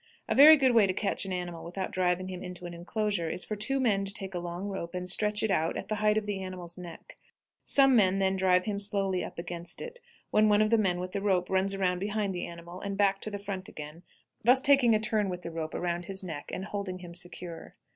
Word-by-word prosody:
A - - +1
very 305 +3 +9
good 260 -3 +3
way 220 -4 +5
to 185 - 0
catch 200 -1 -1
an 190 - -5
animal 175 -2 -4
without 180 +3 -5
driving 185 0 0
him 185 -1 -6
into 180 -1 -7
an 175 - -6
inclosure 180 0 -2
is 180 - -2
for 215 - -3
two 240 +7 0
men 210 -6 +2
to 195 - -5
take 195 -1 -5
a 175 - -2
long 175 +2 -5
rope 190 -3 -5
and 180 0 -4
stretch 210 +2 +1
it 220 - +1
out 160 -2 +1
at - - -6
the - - 0
height 210 0 +3
of 215 - 0
the 205 -2 -3
animal's 180 -2 -5
neck; 175 -2 -11 0.4
some 270 -2 +5
men 195 -4 +4
then 190 0 +1
drive 185 -1 +3
him 205 -2 -2
slowly 195 -2 0
up - - -8
against 175 0 -6
it, 485 0 -7 0.3
when 215 0 +4
one 210 +1 +5
of 215 - 0
the 230 - +5
men 180 -4 +1
with 180 0 -5
the 200 - -3
rope 190 -3 +1
runs 190 +1 +1
around 180 -2 0
behind 205 0 -1
the 175 - -4
animal 170 +2 -10
and 200 -1 -4
back 195 -1 +2
to - - -2
the 205 - -4
front 200 -2 -6
again, 150 +2 -9 0.4
thus 250 +4 +6
taking 270 -5 +5
a - - +2
turn 215 -2 0
with 180 -1 -5
the 170 - -5
rope 160 -1 -5
around 175 0 -2
his 190 0 -5
neck 160 -5 -6
and 190 - -4
holding 200 -3 -4
him 175 -2 -10
secure. 175 -1 -6
190 Hz, 255 wpm, -29 LUFS, 180-210 Hz, 0.4 s, very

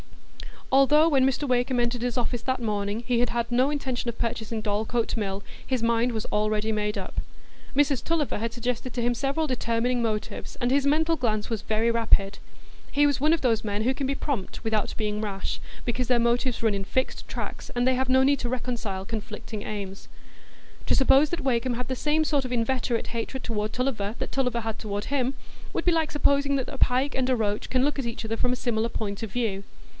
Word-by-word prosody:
Although, 295 +4 +6
when 265 -3 +4
Mr 270 +2 0
Wakem 250 0 +2
entered 240 0 0
his 245 0 -1
office 245 -1 0
that 260 0 -1
morning, 205 -1 -1
he 240 -1 +2
had 245 0 +2
had 235 0 -1
no 255 +3 +3
intention 265 -4 -2
of 235 - -5
purchasing 225 -1 -2
Dorlcote 220 +3 0
Mill, 195 -2 -2 0.2
his 255 -3 0
mind 235 +1 +2
was 220 -2 -3
already 215 +1 +1
made 210 -1 -1
up. - - -4 0.6
Mrs 280 -2 +3
Tulliver 320 -8 0
had 230 +1 -2
suggested 245 +1 -3
to 245 - -1
him 240 +1 +2
several 275 +6 0
determining 245 -1 0
motives, 215 -2 -3
and 245 +1 +2
his 280 +1 +3
mental 320 +3 +3
glance 215 -4 0
was 225 -3 -2
very 220 +2 +1
rapid; 210 -4 +2 0.5
he 290 +1 +3
was 285 -2 +2
one 305 +4 +4
of 330 - 0
those 225 -4 +2
men 205 0 -1
who 255 +3 +2
can 270 0 -2
be 275 - 0
prompt 270 -10 -3
without 220 -2 0
being 210 -1 -1
rash, 200 -2 -3 0.3
because 245 0 -1
their 250 - +4
motives 235 +1 +1
run 220 -2 +3
in 195 -1 -2
fixed 260 +6 -1
tracks, - - -6
and 245 0 +2
they 260 0 +4
have 260 0 0
no 260 +1 +5
need 280 0 +3
to 240 - -2
reconcile 235 -6 -3
conflicting 215 -1 -5
aims. 195 -2 -6 0.8
To - - +4
suppose 275 +2 +5
that 345 -1 -2
Wakem 255 -2 +1
had 245 0 -4
the 260 - 0
same 305 +3 +2
sort 290 -3 +1
of 250 - -3
inveterate 240 0 0
hatred 235 +3 -4
toward 215 -2 -2
Tulliver 230 -5 -1
that - - -4
Tulliver 250 -3 0
had 220 -1 -4
toward 205 -1 -3
him 270 -2 0 0.4
would - - -2
be 355 - +5
like 325 -2 +1
supposing 280 -1 +2
that 265 -2 -1
a 275 - -6
pike 260 +2 +2
and 260 -1 0
a 255 - +4
roach 210 -2 -1
can 255 0 +2
look 290 0 +1
at 265 - -2
each 230 0 -4
other 225 +1 -2
from 250 +1 +1
a - - +1
similar 235 -2 0
point 205 -2 -4
of 220 -3 -4
view. 210 -5 -1
240 Hz, 215 wpm, -26 LUFS, 220-265 Hz, 0.8 s, Although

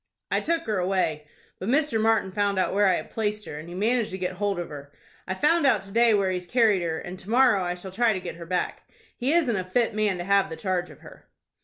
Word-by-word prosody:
"I - - +2
took 330 0 -1
her 210 -3 -1
away, 180 -5 -1 0.3
but 190 - -4
Mr. 280 -4 +2
Martin 220 -3 +2
found 200 0 0
out 185 - +1
where 205 0 +3
I 185 - +4
had - - -6
placed 210 -1 -2
her, 150 - -7
and 160 +2 -10
he 175 - -8
managed 225 +3 +1
to 190 - -5
get 180 -1 -4
hold 200 -1 -1
of 175 - -4
her. 145 -1 -10 0.4
I 190 - -2
found 300 - +3
out 220 -7 +3
to 195 - -12
day 230 0 +4
where 195 -2 +1
he 180 -1 -2
carried 210 0 +2
her, 165 -2 -2
and 180 +2 -7
to 195 - -12
morrow 240 -4 +4
I 175 0 -2
shall 185 +1 -9
try 230 +4 +2
to 195 - -1
get 180 -2 -7
her 170 -1 -9
back. 180 +1 -3 0.3
He 255 +4 -1
isn't 310 -9 +2
a 185 - -1
fit 225 +5 0
man 210 -3 0
to 175 - -4
have 200 +1 +2
the 160 - -5
charge 180 -1 -2
of - - -15
her." - - -15
195 Hz, 270 wpm, -25 LUFS, 180-225 Hz, 0.4 s, I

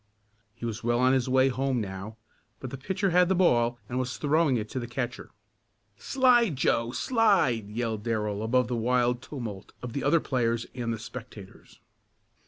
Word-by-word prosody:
He 120 - -7
was 115 -1 -4
well 120 +1 +1
on 130 +1 +4
his 130 -1 +1
way 130 +1 +4
home 130 0 0
now, 100 +1 -6 0.4
but 130 - -7
the - - -4
pitcher 190 +6 -1
had 180 +1 +4
the 190 - +3
ball 120 -10 +3
and 125 +2 -2
was 130 0 -3
throwing 150 -2 +2
it 110 -1 -3
to 130 - -3
the 120 - -5
catcher. 120 0 -4 0.7
"Slide, 240 - +3
Joe! 115 -2 +1
Slide!" 185 - +2
yelled 110 -1 -3
Darrell 105 -2 -2
above 125 +3 +2
the 125 - -2
wild 125 +1 +1
tumult 115 -8 -7
of 120 -2 -5
the 140 - -3
other 165 - +4
players 120 -5 -1
and 120 -2 -3
the 115 - -2
spectators. 110 -3 -11
125 Hz, 180 wpm, -27 LUFS, 115-135 Hz, 0.7 s, on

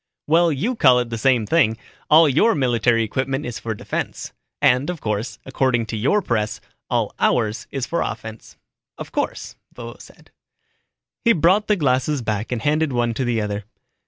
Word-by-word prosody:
"Well, 165 +2 +3
you 195 - -1
call 130 - +5
it 120 -1 -1
the 115 - -2
same 125 -2 +2
thing. 115 -4 +2 0.3
All 155 +1 +7
your 160 - +3
military 120 -4 +2
equipment 135 +5 -2
is 120 -1 -5
for 110 -1 -4
defense. - - -5 0.3
And, 140 +1 +3
of 175 -2 -4
course, 105 0 -3
according 130 -3 0
to 115 - -5
your 140 - +1
press, 105 -5 -1 0.3
all - - 0
ours 115 0 0
is 135 -3 -3
for 170 - -2
offense." 110 +1 -7 0.4
"Of - - -8
course," - - -4 0.2
Vovo 120 -1 -9
said. - - -17 0.9
He 230 - +5
brought 185 +6 +3
the 210 - +3
glasses 135 -3 0
back 105 0 -3
and 120 -3 -3
handed 150 0 +1
one 120 -2 0
to 125 - -2
the 120 -2 0
other. 105 0 -3
125 Hz, 175 wpm, -21 LUFS, 115-150 Hz, 0.9 s, All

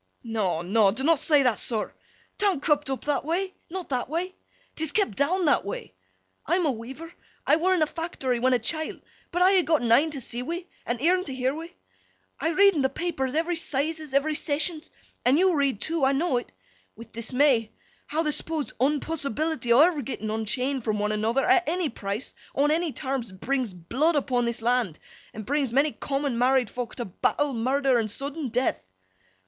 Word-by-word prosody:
'No 205 -8 -1
no, 200 +3 +4
dunnot 270 +9 +2
say 295 -3 +4
that, 245 -4 +2
sir. 220 -3 0 0.5
'Tan't 390 -8 +1
kep' 295 -2 +2
up 265 - -4
that 290 -1 0
way. 370 +5 -1 0.2
Not 365 +1 -6
that 255 -2 -1
way. 350 +4 -2 0.4
'Tis 315 -1 -1
kep' 405 - +1
down 335 - +1
that 290 - +3
way. 200 - -6 0.5
I'm 350 +3 +2
a 295 - +3
weaver, 265 +8 -8 0.3
I - - +4
were 370 +3 +2
in 335 - +3
a - - +4
fact'ry 295 -7 -3
when 255 +2 +3
a - - +5
chilt, 315 +7 -3 0.3
but 355 +1 +2
I 380 +1 +6
ha' - - -5
gotten 295 -9 +1
een 290 +7 +5
to 295 -3 -5
see 240 -1 -5
wi' 340 +7 -4 0.2
and 240 0 -1
eern 365 +2 +3
to 270 - -5
year 260 +1 0
wi'. 325 +3 -7 0.7
I 320 - 0
read 395 +3 +5
in 300 - 0
th' 265 0 +1
papers 295 -6 -2
every 335 +2 +1
'Sizes, 310 -1 -2
every 300 +3 +2
Sessions—and 305 -3 -1
you 370 +1 +4
read 280 -8 +1
too—I 300 -4 +1
know 275 -2 +1
it!—with 230 -1 -11
dismay—how 250 +5 0
th' 300 -2 +1
supposed 310 0 -3
unpossibility 295 0 0
o' 240 +4 +7
ever 320 -2 +4
getting 220 -4 -4
unchained 250 +4 -1
from 215 -2 0
one 210 0 0
another, 225 +5 +1
at 370 -4 +3
any 345 -2 0
price, 205 +1 -4 0.2
on 290 +2 +3
any 330 0 +1
terms, 260 -6 -3
brings 250 +4 -2
blood 245 - 0
upon 255 -4 +1
this 235 -1 -3
land, 235 -9 +1 0.3
and 215 -1 -8
brings 280 0 0
many 280 +4 +3
common 275 -4 -2
married 255 -2 +3
fok 245 -2 -5
to 240 - -4
battle, 280 +9 0
murder, 260 +2 +2
and 220 -1 -1
sudden 280 +6 -3
death. 250 +3 0
275 Hz, 185 wpm, -26 LUFS, 240-320 Hz, 0.7 s, o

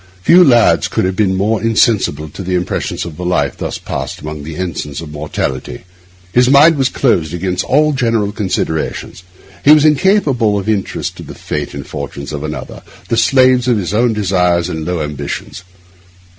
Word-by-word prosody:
Few 180 - +7
lads 120 -7 +4
could - - -1
have 95 0 -1
been 95 -2 +1
more 105 +3 0
insensible 110 - +1
to 85 - -9
the 90 0 -2
impressions 90 0 -2
of 85 -1 -9
a - - -4
life 80 -6 0
thus - - -4
passed 65 0 -5
among 75 0 -7
the 80 +2 -7
ensigns 75 -5 -4
of 80 -2 -8
mortality. 70 -4 -4 0.5
His 125 +1 +4
mind 150 +4 +6
was 135 -1 +1
closed 85 - 0
against 90 +1 -2
all 150 +3 +2
general 115 -5 0
considerations. 95 -5 -3 0.4
He - - +3
was 155 0 +5
incapable 145 - +2
of 100 - -4
interest 105 -3 -2
in - - -9
the - - -9
fate - - -5
and - - -6
fortunes 70 +2 -7
of 70 - -5
another, - - -6 0.3
the - - +1
slave 130 +1 +3
of 120 -3 +3
his 95 -1 -3
own 115 +2 +2
desires 90 -4 +1
and 80 -3 -4
low 90 -3 -1
ambitions. 75 +3 -6
95 Hz, 180 wpm, -15 LUFS, 80-120 Hz, 0.5 s, Few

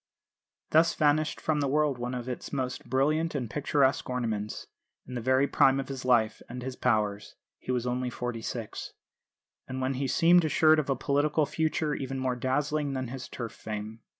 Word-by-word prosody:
Thus 160 +2 +4
vanished 155 0 +2
from 155 -2 0
the 140 - +1
world 145 -2 +1
one 125 +1 -3
of 125 0 -5
its 125 - -5
most 130 -3 -3
brilliant 155 +5 +1
and 125 -4 -2
picturesque 140 +1 +1
ornaments, 110 -4 -3 0.4
in 125 - -9
the 120 - -3
very 130 +3 +3
prime 135 -1 +4
of 135 - -4
his 135 -1 -5
life 115 -4 +3
and 125 +1 -6
his 130 0 -5
powers 105 -5 0 0.2
(he - - -4
was 125 -1 0
only 125 0 -1
forty 120 -1 -4
six), 115 -1 -5 0.7
and 130 0 -4
when 130 +1 0
he 135 +1 -2
seemed 175 +6 +5
assured 155 0 +4
of 145 - -2
a 135 - +2
political 145 +3 +1
future 155 0 -1
even 135 -1 -4
more 130 -1 -1
dazzling 145 +3 -1
than 130 -2 -3
his 130 0 -7
Turf 115 -3 -5
fame. 110 +1 -6
130 Hz, 185 wpm, -29 LUFS, 125-145 Hz, 0.7 s, seemed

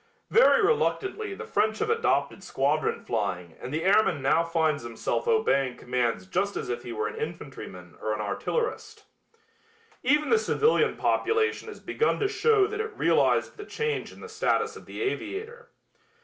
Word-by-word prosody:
Very 475 -1 +6
reluctantly 410 -1 0
the 455 - -7
French 220 - +1
have 440 - 0
adopted 455 - 0
squadron 145 0 0
flying 95 -7 -3
and 125 - -6
the 160 +2 -2
airman 195 -4 +3
now 150 +5 +3
finds 160 -3 0
himself 120 - -3
obeying 140 - +2
commands 120 -6 -1
just 195 - -1
as - - -4
if 120 0 -2
he 120 - -7
were 110 -2 -2
an 105 - -6
infantryman 135 - -7
or 110 - -2
an 105 - -2
artillerist. 440 - -3 1.0
Even 295 +4 +2
the 455 - +5
civilian 450 0 +2
population 445 0 +1
has 435 - -9
begun 450 - 0
to 410 - +2
show 430 -1 +3
that 425 +1 -3
it 440 0 -6
realized - - +2
the 415 - -7
change 450 +2 -3
in - - -14
the - - -8
status 445 0 0
of - - -12
the - - -5
aviator. 450 +4 -4
245 Hz, 165 wpm, -27 LUFS, -, 1.0 s, Very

